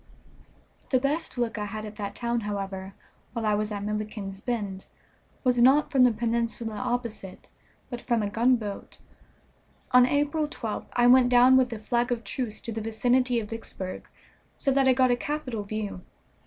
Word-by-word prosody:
The 260 - +3
best 285 +2 -2
look 230 -2 -1
I 210 - -2
had 215 +1 -5
at 210 0 -8
that 200 -2 -5
town, 235 0 -1
however, 195 -2 -5 0.4
while 230 -2 -3
I 210 - +2
was 210 +1 -1
at 205 -1 -4
Milliken's 210 -2 -4
Bend 205 -6 -3 0.6
was 250 -2 +2
not 275 +5 +5
from 265 -3 +5
the 250 - +5
peninsula 230 0 -2
opposite, 235 -4 -4 0.4
but 245 -2 -6
from 235 -3 0
a 205 - -1
gunboat. 225 -2 0 0.9
On 250 0 +7
April 290 +2 +1
12th 225 -7 -5
I 240 - +3
went 250 0 +6
down 250 +1 +6
with 255 -2 +3
a 230 - -4
flag 240 +3 -1
of 235 -1 -1
truce 220 +2 -4
to 230 - -4
the 225 0 -4
vicinity 245 +3 +1
of 210 -1 -7
Vicksburg, 195 -4 -6 0.5
so 275 - +1
that 270 0 +3
I 260 - +6
got 255 0 +3
a - - +4
capital 255 -4 -3
view. 205 -2 -5
235 Hz, 175 wpm, -27 LUFS, 210-250 Hz, 0.9 s, On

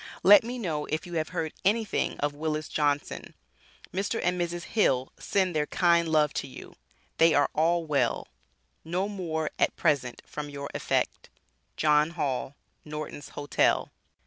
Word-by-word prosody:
Let 200 +3 +9
me 245 +2 -5
know 160 -10 -2
if 155 +4 -2
you 175 - -9
have 160 -2 -1
heard 160 -1 -3
anything 215 +2 +1
of 145 0 0
Willis 155 0 -2
Johnson 145 -1 -1 0.6
Mr. 200 +4 -1
& - - -5
Mrs. 175 -1 -1
Hill 135 - +1
send 185 -4 0
their 150 -1 +1
kind 170 -2 +3
love 155 -2 +3
to - - -9
you, - - -11 0.4
they 165 -1 +6
are 145 - +3
all 165 +2 +2
well, 150 -3 0 0.6
no 180 +4 -1
more 165 -6 -3
at - - +2
present 140 -6 0
from 150 -1 -6
your 140 0 -6
affect., - - -1 0.5
JOHN 150 0 +4
HALL 135 -2 -2 0.3
Nortons 150 -1 -7
Hotel. 145 0 +1
155 Hz, 150 wpm, -28 LUFS, 150-175 Hz, 0.6 s, Let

